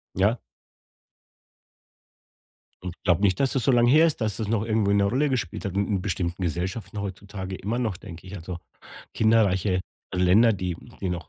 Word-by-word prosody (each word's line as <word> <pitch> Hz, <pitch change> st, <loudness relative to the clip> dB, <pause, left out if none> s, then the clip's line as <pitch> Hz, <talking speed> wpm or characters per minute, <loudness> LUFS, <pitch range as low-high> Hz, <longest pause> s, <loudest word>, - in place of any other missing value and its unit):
Ja. -, -, +2 dB, 2.4 s
Und 90 Hz, -2 st, -5 dB
glaube 90 Hz, -2 st, +3 dB
nicht, 95 Hz, -3 st, +3 dB
dass 135 Hz, -2 st, +2 dB
das 130 Hz, -4 st, 0 dB
so 135 Hz, -, +4 dB
lang 120 Hz, -1 st, +4 dB
her 155 Hz, +7 st, +6 dB
ist, 160 Hz, -, -1 dB
dass 110 Hz, -3 st, -1 dB
das 110 Hz, -, -3 dB
noch 110 Hz, -1 st, 0 dB
irgendwo 110 Hz, -2 st, +1 dB
'ne 100 Hz, 0 st, +3 dB
Rolle 130 Hz, +9 st, +1 dB
gespielt 115 Hz, -11 st, -3 dB
hat 95 Hz, -, -4 dB
'n 100 Hz, 0 st, +1 dB
in 100 Hz, -4 st, -1 dB
bestimmten 90 Hz, -2 st, -2 dB
Gesellschaften 90 Hz, +6 st, -3 dB
heutzutage 95 Hz, -1 st, -6 dB
immer 105 Hz, +6 st, -3 dB
noch, 110 Hz, -7 st, -1 dB
denke 90 Hz, -3 st, -11 dB
ich 95 Hz, -, -8 dB
Also 90 Hz, 0 st, -6 dB, 0.6 s
kinderreiche 100 Hz, -4 st, +2 dB, 0.3 s
Länder, 95 Hz, +6 st, +5 dB
die 90 Hz, -3 st, -3 dB, 0.2 s
die 95 Hz, -, -2 dB
noch, 85 Hz, -3 st, -5 dB
100 Hz, 175 wpm, -25 LUFS, 90-110 Hz, 2.4 s, her